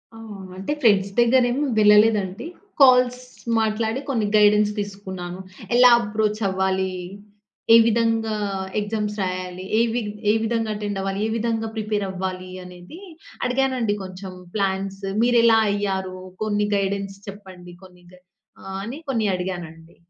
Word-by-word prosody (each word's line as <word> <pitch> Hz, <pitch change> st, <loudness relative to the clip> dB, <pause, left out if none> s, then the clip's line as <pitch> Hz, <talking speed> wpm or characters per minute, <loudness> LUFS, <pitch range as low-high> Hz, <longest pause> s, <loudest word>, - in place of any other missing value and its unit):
ఆ! -, -, -11 dB, 0.2 s
ఆ! -, -, -10 dB, 0.2 s
అంటే, 195 Hz, +8 st, -4 dB
ఫ్రెండ్స్ 200 Hz, -4 st, +3 dB
దగ్గర 245 Hz, +2 st, +5 dB
ఏమి 270 Hz, +4 st, -1 dB, 0.2 s
వెళ్ళలేదండి. 210 Hz, 0 st, +4 dB, 0.4 s
కాల్స్ 250 Hz, -1 st, +5 dB, 0.4 s
మాట్లాడి 220 Hz, +2 st, -1 dB
కొన్ని 230 Hz, -6 st, 0 dB
గైడెన్స్ 210 Hz, 0 st, +5 dB
తీసుకున్నాను. 190 Hz, -3 st, -6 dB, 0.4 s
ఎలా 250 Hz, 0 st, +8 dB
అప్రోచ్ 215 Hz, 0 st, -1 dB
అవ్వాలి? 190 Hz, 0 st, -1 dB, 0.8 s
ఏ -, -, +10 dB
విధంగా 225 Hz, -1 st, +1 dB, 0.4 s
ఎగ్జామ్స్ 210 Hz, 0 st, -3 dB
రాయాలి? 185 Hz, 0 st, -4 dB
ఏ -, -, +5 dB
వి 245 Hz, -, 0 dB, 0.3 s
ఏ -, -, +2 dB
విధంగా 225 Hz, -1 st, -1 dB
అటెండ్ 205 Hz, -1 st, -4 dB
అవ్వాలి? 195 Hz, 0 st, -3 dB
ఏ -, -, -3 dB
విధంగా 225 Hz, 0 st, -1 dB
ప్రిపేర్ 210 Hz, -2 st, -2 dB
అవ్వాలి 185 Hz, 0 st, -5 dB
అనేది 180 Hz, -, -12 dB, 0.5 s
అడిగానండి 250 Hz, -4 st, 0 dB
కొంచెం 185 Hz, 0 st, -8 dB, 0.2 s
ప్లాన్స్. 195 Hz, 0 st, -2 dB, 0.2 s
మీరు 245 Hz, -1 st, +4 dB
ఎలా 225 Hz, -1 st, +6 dB
అయ్యారు? 190 Hz, -2 st, -2 dB, 0.3 s
కొన్ని 205 Hz, -1 st, 0 dB
గైడెన్స్ 195 Hz, 0 st, -2 dB
చెప్పండి. 185 Hz, -3 st, -11 dB
కొన్ని 180 Hz, -1 st, -17 dB
గైడె 180 Hz, 0 st, -20 dB, 0.4 s
ఆహ్, 195 Hz, 0 st, -6 dB
అని 245 Hz, +6 st, -6 dB
కొన్ని 225 Hz, -5 st, 0 dB
అడిగానండి. 170 Hz, -3 st, -7 dB
205 Hz, 135 wpm, -22 LUFS, 190-225 Hz, 0.8 s, ఏ